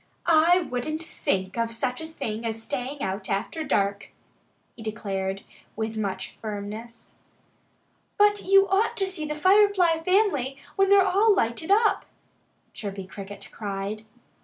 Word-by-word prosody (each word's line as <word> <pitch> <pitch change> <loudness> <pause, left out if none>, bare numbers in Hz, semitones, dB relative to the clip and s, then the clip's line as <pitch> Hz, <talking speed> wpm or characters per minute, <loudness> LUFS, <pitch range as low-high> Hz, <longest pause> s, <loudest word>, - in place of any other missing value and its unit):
"I 340 +2 +5
wouldn't 310 +2 -3
think 190 - -2
of 230 0 +1
such 250 +3 -2
a 320 - -6
thing 235 -8 -5
as 225 -1 -2
staying 270 +2 -4
out 195 +1 -3
after 205 +11 -2
dark!" 200 -7 0 0.6
he 235 - -12
declared 195 -3 -3 0.3
with 220 0 -3
much 195 -3 -4
firmness. 215 +2 -7 1.0
"But 415 0 +4
you 390 0 +5
ought 395 +4 +1
to 390 - +2
see 370 -5 -3
the 300 0 -3
Firefly 375 -1 +4
family 325 - +1 0.2
when 390 0 +3
they're 400 -1 +6
all 400 +3 +4
lighted 235 +6 -1
up!" 425 +2 +3 0.7
Chirpy 195 -2 -6
Cricket 200 +1 -9
cried. 200 0 -4
250 Hz, 135 wpm, -26 LUFS, -, 1.0 s, they're